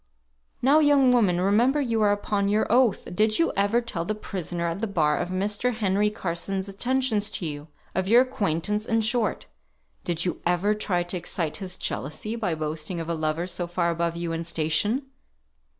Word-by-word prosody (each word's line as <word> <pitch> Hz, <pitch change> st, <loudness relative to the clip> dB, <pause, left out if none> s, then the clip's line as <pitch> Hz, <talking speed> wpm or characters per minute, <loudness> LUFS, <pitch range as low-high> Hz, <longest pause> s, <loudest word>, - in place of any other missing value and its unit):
"Now, 280 Hz, +4 st, +6 dB
young 285 Hz, -4 st, +5 dB
woman, 205 Hz, -8 st, +3 dB
remember 225 Hz, +10 st, +3 dB
you 230 Hz, -5 st, 0 dB
are 205 Hz, -1 st, +4 dB
upon 205 Hz, 0 st, 0 dB
your 210 Hz, +1 st, +2 dB
oath. 240 Hz, -3 st, +3 dB
Did 215 Hz, +2 st, +3 dB
you 335 Hz, -, +2 dB
ever 205 Hz, +4 st, +2 dB
tell 215 Hz, -8 st, -4 dB
the 215 Hz, +5 st, -2 dB
prisoner 175 Hz, -4 st, -3 dB
at 165 Hz, +5 st, -4 dB
the 225 Hz, -, 0 dB
bar 155 Hz, -7 st, +2 dB
of 175 Hz, -, -2 dB
Mr. 205 Hz, +6 st, -1 dB
Henry 205 Hz, -1 st, +1 dB
Carson's 190 Hz, 0 st, -3 dB
attentions 225 Hz, +1 st, 0 dB
to 175 Hz, -, -4 dB
you? 145 Hz, -1 st, -5 dB, 0.3 s
of 190 Hz, 0 st, -1 dB
your 235 Hz, +4 st, +6 dB
acquaintance, 210 Hz, -4 st, -1 dB
in 225 Hz, 0 st, +2 dB
short? 230 Hz, 0 st, 0 dB, 0.6 s
Did 175 Hz, 0 st, -1 dB
you 180 Hz, -, -2 dB
ever 180 Hz, +4 st, +2 dB
try 190 Hz, -4 st, -1 dB
to 175 Hz, +1 st, -3 dB
excite 165 Hz, -2 st, -3 dB
his 185 Hz, -2 st, -3 dB
jealousy 170 Hz, -, -4 dB
by 200 Hz, -8 st, -1 dB
boasting 155 Hz, +3 st, -3 dB
of 165 Hz, 0 st, -5 dB
a -, -, 0 dB
lover 160 Hz, +1 st, -1 dB
so 175 Hz, -1 st, -3 dB
far 175 Hz, 0 st, 0 dB
above 170 Hz, 0 st, -1 dB
you 170 Hz, -1 st, -3 dB
in 165 Hz, 0 st, -2 dB
station?" 165 Hz, -, 0 dB
195 Hz, 185 wpm, -25 LUFS, 170-220 Hz, 0.6 s, Now